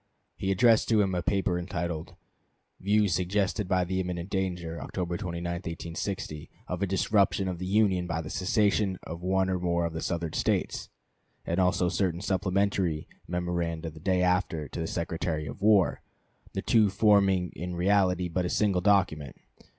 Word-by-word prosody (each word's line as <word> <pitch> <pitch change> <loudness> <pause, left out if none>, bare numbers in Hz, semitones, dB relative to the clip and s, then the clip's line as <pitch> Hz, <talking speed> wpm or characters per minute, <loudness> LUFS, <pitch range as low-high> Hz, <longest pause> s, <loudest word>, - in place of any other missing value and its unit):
He 95 - -3
addressed 110 +4 +4
to 110 -2 +4
him 95 -2 +2
a 90 - 0
paper 95 -1 0
entitled 85 -2 -4 0.6
"Views 105 -1 +2
suggested 95 +3 0
by 90 0 +2
the 95 +1 -2
imminent 90 0 -4
danger 90 -4 -2
(October 85 +4 -3
29, 85 -1 -4
1860) 85 -1 -5 0.2
of 90 +1 -4
a 100 - +1
disruption 95 0 +2
of 90 -2 -3
the 90 - -4
Union 95 -3 +2
by 85 -1 -2
the 80 -2 -6
secession 100 0 +1
of 85 +1 -7
one 95 +1 +1
or 95 -1 0
more 85 -1 0
of 85 - -3
the 80 - -4
Southern 85 -2 -2
States"; - - -1 0.6
and 85 +2 -1
also 90 -1 +2
certain 90 -1 0
supplementary 95 -3 0 0.2
memoranda 85 -2 -2
the 80 - -12
day 90 +2 +1
after, 90 -4 0
to - - -6
the 80 - -2
Secretary 80 -2 -2
of 95 - -8
War, 105 -3 +4 0.5
the - - -3
two 110 -3 +4
forming 95 -3 +3
in 90 +1 -5
reality 90 -1 +2
but 90 +2 -1
a 90 - -1
single 100 -3 +1
document. 90 -8 +2
90 Hz, 165 wpm, -28 LUFS, 85-95 Hz, 0.6 s, addressed